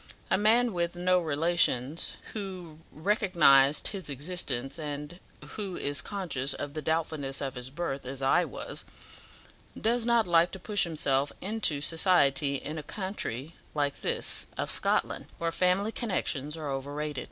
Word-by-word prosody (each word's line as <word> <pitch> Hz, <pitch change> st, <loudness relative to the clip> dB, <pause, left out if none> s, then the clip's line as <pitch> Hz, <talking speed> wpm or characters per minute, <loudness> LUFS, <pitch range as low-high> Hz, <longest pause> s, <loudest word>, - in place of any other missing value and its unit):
A -, -, +5 dB
man 225 Hz, +3 st, +3 dB
with 170 Hz, -1 st, -1 dB
no 180 Hz, +1 st, +3 dB
relations 160 Hz, -3 st, +1 dB, 0.2 s
who 185 Hz, -7 st, -7 dB
recognized 155 Hz, -7 st, +4 dB
his 195 Hz, -6 st, -5 dB
existence, 140 Hz, -2 st, -1 dB
and 150 Hz, +3 st, -6 dB, 0.3 s
who 200 Hz, -4 st, -5 dB
is 145 Hz, 0 st, +1 dB
conscious 145 Hz, -9 st, -2 dB
of 145 Hz, 0 st, -5 dB
the 155 Hz, -, -4 dB
doubtfulness 155 Hz, -3 st, -1 dB
of 135 Hz, -2 st, -3 dB
his 125 Hz, +1 st, -6 dB
birth, 140 Hz, -1 st, -4 dB
as 130 Hz, +1 st, -6 dB
I 135 Hz, +6 st, +3 dB
was, -, -, -6 dB, 1.0 s
does 235 Hz, +2 st, +1 dB
not 235 Hz, -1 st, +3 dB
like 170 Hz, 0 st, +4 dB
to 190 Hz, -, -5 dB
push 205 Hz, 0 st, +2 dB
himself 140 Hz, -4 st, +1 dB
into 195 Hz, -8 st, +1 dB
society 145 Hz, -4 st, +3 dB
in 155 Hz, +3 st, -5 dB
a -, -, -4 dB
country 165 Hz, -, -4 dB, 0.2 s
like 145 Hz, -1 st, -1 dB
this -, -, 0 dB
of -, -, 0 dB
Scotland, -, -, +1 dB
where 170 Hz, 0 st, -1 dB
family 185 Hz, +5 st, +2 dB
connections 160 Hz, -, -2 dB
are 150 Hz, -3 st, -4 dB
overrated. 145 Hz, +1 st, -4 dB
160 Hz, 145 wpm, -29 LUFS, 140-185 Hz, 1.0 s, A